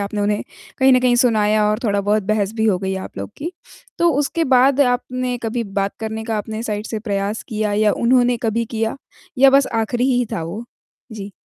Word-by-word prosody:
आपने 205 +1 -3
उन्हें 205 0 0 0.4
कहीं 265 -1 +5
न 255 - +5
कहीं 250 -1 +3
सुनाया 215 -3 +3
और 215 - 0
थोड़ा 205 -2 +1
बहुत 205 +1 +1
बहस 210 0 0
भी 220 - 0
हो 195 -4 +2
गई 190 +1 -2
आप 190 - -8
लोग 100 0 -5
की। 335 +4 -5 0.5
तो 340 0 +4
उसके 305 +3 0
बाद 265 +2 +4
आपने 250 -1 0
कभी 230 +1 -2
बात 195 0 -3
करने 220 0 -4
का 225 -1 -2
आपने 215 +2 -4
साइड 210 -1 -3
से 220 - -4
प्रयास 205 0 -2
किया 215 -3 -1
या 210 0 +3
उन्होंने 245 0 +2
कभी 230 0 0
किया? 225 +1 -3 0.4
या 270 +1 +7
बस 275 0 +4
आखिरी 230 +2 0
ही 245 - +2
था 165 - -2
वो? 180 +8 -6 0.5
जी। 205 -2 -7
220 Hz, 210 wpm, -20 LUFS, 205-245 Hz, 0.5 s, या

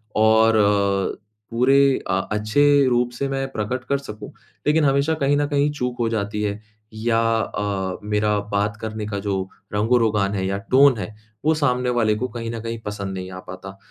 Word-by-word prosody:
और 110 +1 +4
अ, 100 -1 +1 0.3
पूरे 125 +3 +3 0.3
अ 90 +1 +2
अच्छे 110 +6 +1 0.3
रूप 120 0 +2
से 140 +3 -2
मैं 135 0 -2
प्रकट 120 +4 -3
कर 140 - +2
सकूँ, 105 -6 -9 0.4
लेकिन 155 +1 +3
हमेशा 140 +3 +2
कहीं 145 -1 +1
न 145 - +1
कहीं 145 0 +1
चूक 125 -4 -3
हो 115 - +1
जाती 105 -1 -2
है 105 0 -2 0.3
या 115 +1 0 0.2
अ, 100 -3 -2
मेरा 105 0 +1
बात 105 +1 0
करने 110 -1 -4
का 100 -1 -3
जो 100 0 -2 0.4
रंग-रोगान 105 -2 +2
है 95 0 -1
या 100 0 -1
टोन 135 -2 +6
है 105 +2 -6 0.3
वो 160 - +4
सामने 125 -4 +1
वाले 110 -3 +2
को 125 +4 -2
कहीं 115 -1 -5
न 115 - -5
कहीं 115 0 -5
पसंद 100 -2 -4
नहीं 95 0 -6
आ 90 - -7
पाता 95 +1 -9
110 Hz, 185 wpm, -22 LUFS, 105-125 Hz, 0.4 s, टोन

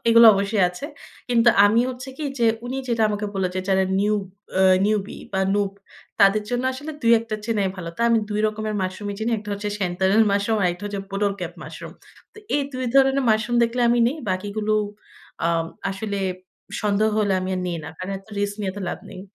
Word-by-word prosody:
এগুলো 230 0 +8
অবশ্যই 200 0 +1
আছে। 180 +11 -7 0.4
কিন্তু 235 -1 +4 0.2
আমি 215 +3 +4
হচ্ছে 255 +1 -8
কি 310 - -3
যে, 235 - +3 0.2
উনি 255 +2 -3
যেটা 230 -2 +1
আমাকে 210 0 -2
বললেন 190 -2 0
যে, - - 0
"যারা 190 0 +3 0.2
নিউ 210 +1 +2 0.5
আ - - +5 0.2
নিউবি 210 -2 -1
বা 190 - 0
নুব 200 -1 +1 0.5
তাদের 200 +2 +5
জন্য 245 0 0
আসলে 290 +4 -7
২ 230 0 +5
১ 225 - -7
টা 215 - 0
চিনাই 210 -4 0
ভালো।" 170 -2 -6
তাই 235 - +1
আমি 230 - +4
২ 210 0 0
রকমের 215 0 -3
মাশরুমই 200 +2 -4
চিনি। 220 +2 -1
১ 210 - -7
টা 210 - -6
হচ্ছে 205 +1 -4
সেন্তানেল 190 +3 +2
মাশরুম, 200 +2 +1
আরেকটা 180 +2 -1
হচ্ছে, 200 -1 -4
বোটল 200 +1 0
ক্যাপ 175 -1 -4
মাশরুম। - - -9 0.4
তো - - -15 0.2
এই 285 - +1
২ 255 0 -3
ধরনের 270 0 +4
মাশরুম 220 +2 +1
দেখলে 235 +2 0
আমি 240 +1 +3
নেই। 275 - -4
বাকিগুলো 205 +3 -2 0.7
আ - - +2 0.4
আসলে 200 +1 -4 0.6
সন্দেহ 210 +1 +2
হলে, 205 -2 +2
আমি 185 - -3
আর - - -2
নেই 175 -1 -2
না। - - -6
কারণ 185 +1 -5
এত 195 - -22
রিস্ক 205 0 -1
নিয়ে 195 -2 -1
এত 200 - -8
লাভ - - -4
নেই। 185 - -9
210 Hz, 210 wpm, -23 LUFS, 195-230 Hz, 0.7 s, এগুলো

